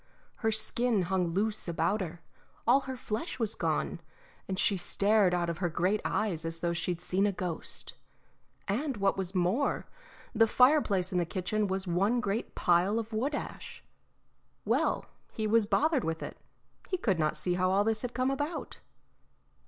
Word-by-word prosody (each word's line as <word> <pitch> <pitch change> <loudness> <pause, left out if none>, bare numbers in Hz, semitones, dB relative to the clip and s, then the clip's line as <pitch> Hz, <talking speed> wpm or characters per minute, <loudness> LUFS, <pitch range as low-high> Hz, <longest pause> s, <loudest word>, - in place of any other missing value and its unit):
Her 220 -2 +1
skin 220 -1 +1
hung 180 0 0
loose 205 +5 -1
about 195 +5 0
her, 170 -2 -6 0.4
all 250 +4 +6
her 265 -1 -6
flesh 225 +7 -4
was 225 -3 0
gone, 165 -1 -1 0.5
and 190 - -3
she 200 - +3
stared 200 +1 +3
out 175 -1 0
of 170 -1 -3
her 175 -3 0
great 185 +6 +1
eyes 175 -7 -1
as 165 0 -3
though 170 0 0
she'd 175 0 -2
seen 190 +3 +1
a - - +1
ghost; 180 -3 -3 0.7
and 255 +5 -1
what 195 -1 +2
was 190 0 -4
more, 185 +10 +1 0.5
the 225 -1 +5
fireplace 225 -8 +4
in 180 - +1
the - - +2
kitchen 200 +4 -1
was 190 0 -1
one 195 +7 +2
great 210 0 -2
pile 180 +5 +3
of 225 0 -4
wood 265 +7 0
ash. - - -7 0.8
Well, - - +1 0.3
he 220 - -3
was 215 0 +3
bothered 305 +2 +2
with 160 0 -2
it; - - -6 0.5
he 370 - 0
could 195 - 0
not 155 -1 +1
see 180 - 0
how 185 +1 +1
all 195 +2 +3
this 220 0 +1
had 245 -1 -5
come 255 +2 +1
about. 290 +5 -4
200 Hz, 175 wpm, -30 LUFS, 180-225 Hz, 0.8 s, all